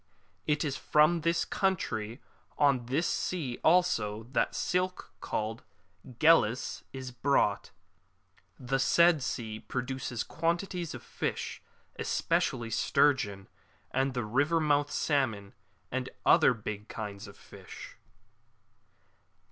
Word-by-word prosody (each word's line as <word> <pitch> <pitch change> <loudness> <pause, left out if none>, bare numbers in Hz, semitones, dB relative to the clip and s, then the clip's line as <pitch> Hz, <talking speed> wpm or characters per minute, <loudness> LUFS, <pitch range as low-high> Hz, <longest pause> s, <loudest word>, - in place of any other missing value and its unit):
It 150 0 +1
is 140 -2 -2
from 155 +3 +3
the 170 +2 +1
country 125 - -1 0.4
on 140 -5 +3
this 145 +7 0
sea 145 -10 -2
also 115 -12 +2
that - - +2
the - - -13
silk 180 0 -1
called 110 +2 -3 0.6
GhellS 150 -7 +3
is 130 -1 -7
brought.^ 125 -5 +1 0.9
[The 135 +2 -1
said 170 +2 +4
sea 110 -4 -4
produces 125 -1 -4
quantities 170 +1 -2
of - - -9
fish, - - -4 0.4
especially 115 -1 0
sturgeon, 115 -8 +2 0.4
at 135 0 0
the 125 -3 -1
river 140 +9 +2
mouths 145 -2 +1
salmon, 110 -9 0 0.4
and 130 0 -2 0.2
other 125 - +6
big 105 -1 -6
kinds 100 -2 -6
of - - -13
fish. - - -12
135 Hz, 110 wpm, -30 LUFS, 115-160 Hz, 0.9 s, other